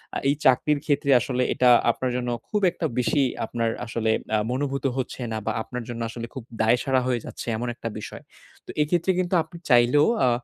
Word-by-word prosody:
আ - - 0
এই 140 - +2
চাকরির 145 +3 +4
ক্ষেত্রে 140 -1 +1
আসলে 125 +1 -1
এটা 125 - +4 0.2
আপনার 125 +2 -3
জন্য 125 -1 -2 0.2
খুব 210 - 0
একটা 170 - -4
বেশি 125 +4 +2 0.2
আপনার 115 -1 -1 0.2
আসলে 115 -1 -1 0.2
আ - - +4
মনোভূত 140 +1 -2
হচ্ছে 130 0 -4
না 110 - -2
বা 110 - 0
আপনার 125 +1 -6
জন্য 120 -1 -5
আসলে 115 +1 -6
খুব 130 -4 -7 0.2
দায়সারা 125 +4 +2
হয়ে 125 -2 +1
যাচ্ছে - - -8
এমন 120 +2 -3
একটা 115 - -5
বিষয়। - - -9 0.4
তো - - -20
এক্ষেত্রে 170 +4 +1
কিন্তু 180 0 -1
আপনি 170 +2 -13
চাইলেও 125 +5 +5 0.2
আ - - +4
125 Hz, 195 wpm, -24 LUFS, 120-145 Hz, 0.4 s, চাইলেও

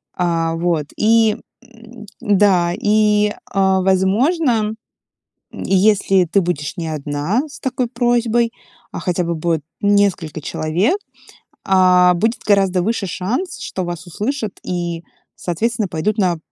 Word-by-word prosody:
А, 165 -2 0
вот 165 -3 -1
и, 220 0 +3 0.3
м, 230 -2 -14 0.2
да, 190 -4 +3
и, 210 0 +2 0.2
а, 190 -1 +2
возможно, 215 - +2 0.8
если 195 -1 +2
ты 195 +4 +2
будешь 170 -4 -3
не 165 -2 -4
одна 155 - -2
с 295 - -12
такой 255 -1 -2
просьбой, 240 -1 +1 0.4
а - - -5
хотя 180 0 -1
бы 170 0 -2
будет 160 -1 -1 0.2
несколько 200 -6 +1
человек, 175 - 0 0.7
а, 180 -1 +5
будет 220 +7 0
гораздо 195 -3 +3
выше 220 +1 -1
шанс, 235 - -3
что 185 - -4
вас 175 -1 -6
услышат 215 - -4
и, 175 -2 -3 0.3
соответственно, 220 +4 -2
пойдут 180 +6 -1
на, 180 -4 +1
195 Hz, 125 wpm, -18 LUFS, 175-225 Hz, 0.8 s, а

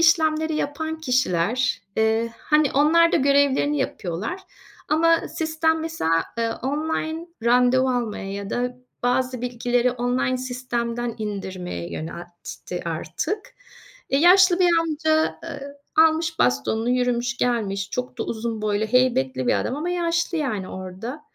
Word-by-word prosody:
işlemleri 315 -1 +3
yapan 315 +2 -3
kişiler, 250 - +1
eee, 220 +1 +1
hani, 300 -2 +2
onlar 330 +4 +4
da - - +5
görevlerini 285 +1 +3
yapıyorlar 210 - -3 0.5
ama 330 +2 +3
sistem 320 0 0
mesela, 165 - 0
eee, 230 0 +1
online 315 +4 -2 0.2
randevu 250 +2 +4
almaya 220 -5 -2
ya 200 0 -5
da 250 +1 -2 0.3
bazı 250 0 0
bilgileri 245 0 +1
online 250 +1 0
sistemden 240 -2 -3
indirmeye 190 - -5
yöneltti 175 +2 -7
artık. 170 - -4 0.6
E, 270 - +3
yaşlı 365 +3 +6
bir 355 - +5
amca, 315 0 +1
eee, 285 -3 -7 0.2
almış 320 0 +4
bastonunu 175 - +1
yürümüş 245 -1 0
gelmiş. 200 -5 -1
Çok 250 0 -4
da - - 0
uzun 225 -1 -4
boylu, 210 0 0
heybetli 170 - +2
bir - - +3
adam 255 - -2
ama 325 +4 -2
yaşlı, 340 -1 0
yani, 215 -10 -2
orada. 190 +9 -7
250 Hz, 125 wpm, -23 LUFS, 220-315 Hz, 0.6 s, yaşlı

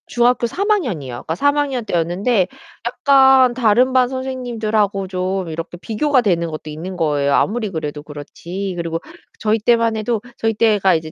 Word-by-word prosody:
중학교 240 0 +2
3 400 - -3
학년이요. 185 - -1
그니까 160 - -4
3 285 +8 +2
학년 270 -5 -1
때였는데 180 +4 +1 0.4
약간 265 0 +5
다른 245 +1 +3
반 255 -1 +3
선생님들하고 225 -7 -2
좀 185 -1 -2
이렇게 165 +2 -6
비교가 255 - +1
되는 170 -6 0
것도 155 0 -7
있는 165 +5 -6
거예요. 145 -4 +1
아무리 215 +8 +1
그래도 150 -4 -5
그렇지. 170 +6 -6
그리고 165 -1 -3 0.4
저희 220 +1 +1
때만 230 0 +2
해도 220 0 -1 0.2
저희 225 0 0
때가 210 -4 +3
이제 160 -1 -4
210 Hz, 360 characters per minute, -19 LUFS, 170-245 Hz, 0.4 s, 약간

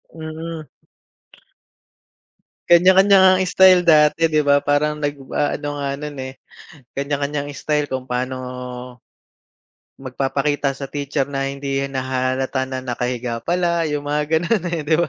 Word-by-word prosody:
Mm. 160 0 -7 2.0
Kanya-kanya 190 +3 +6
ngang 185 0 +5
istyle 185 -1 +5
dati, 155 -1 +4
'di 155 - +3
ba? 140 0 +4
Parang 150 +1 +1
nagw 145 -1 -2 0.2
aano 145 0 -1
nga 140 -1 -3
no'n, 150 -1 -6
eh, 130 - -9 0.6
kanya-kanyang 145 +1 -2
istyle 150 0 -2
kung 130 0 -4
paano 125 +1 -2 1.6
magpapakita 135 +1 -2
sa 140 - -6
teacher 140 -1 -1
na 135 -1 -2
hindi 140 0 -3
nahahalata 130 0 -2
na 130 -1 -5
nakahiga 120 -1 -3
pala, 170 +1 0
'yong 145 -1 -3
mga 150 +1 0
gano'n, 175 +4 0
eh, - - -3
'di 155 +1 +2
ba? - - 0
145 Hz, 125 wpm, -20 LUFS, 135-160 Hz, 2.0 s, Kanya-kanya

